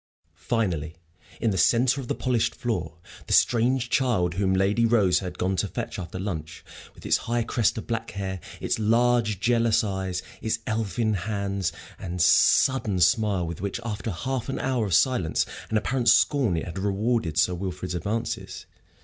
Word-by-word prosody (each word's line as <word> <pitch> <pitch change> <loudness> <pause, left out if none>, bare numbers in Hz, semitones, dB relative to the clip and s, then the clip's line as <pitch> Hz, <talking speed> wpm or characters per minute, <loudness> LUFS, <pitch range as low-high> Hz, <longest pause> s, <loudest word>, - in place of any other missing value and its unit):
Finally, 85 -2 -2 0.4
in 115 - +1
the 95 - -1
centre 130 +3 +3
of 125 - -9
the - - -1
polished 125 -3 0
floor, 90 -9 -3 0.3
the - - -1
strange 125 +2 +3
child, 110 -10 +1
whom 95 +1 0
Lady 95 +4 +2
Rose 105 -6 +3
had 90 -2 -6
gone 95 +1 0
to - - 0
fetch - - -5
after 90 0 -6
lunch, 85 -5 -5 0.3
with - - -15
its - - +3
high 120 0 +1
crest 115 -1 0
of 110 - -5
black 115 -1 -3
hair, 95 -1 -4 0.2
its - - -1
large, 115 -1 +2
jealous 115 0 +2
eyes, 95 -3 -3 0.2
its 110 +1 0
elfin 110 0 -1
hands, 100 -1 -2 0.3
and 90 -1 -5
the 85 - +3
sudden 110 -5 +4
smile 100 0 +2
with 85 0 -6
which, 100 +3 -3
after 115 0 -4
half 130 +8 -3
an 135 - -2
hour 125 -5 0
of 90 - +2
silence 90 - +2 0.2
and 110 - +1
apparent 120 +2 +1
scorn, 120 - +3
it 80 - -3
had 90 +2 -6
rewarded 100 -3 -1
Sir 90 +3 +3
Wilfrid's 90 0 -4
advances. 105 +7 -4
105 Hz, 175 wpm, -25 LUFS, 90-115 Hz, 0.4 s, sudden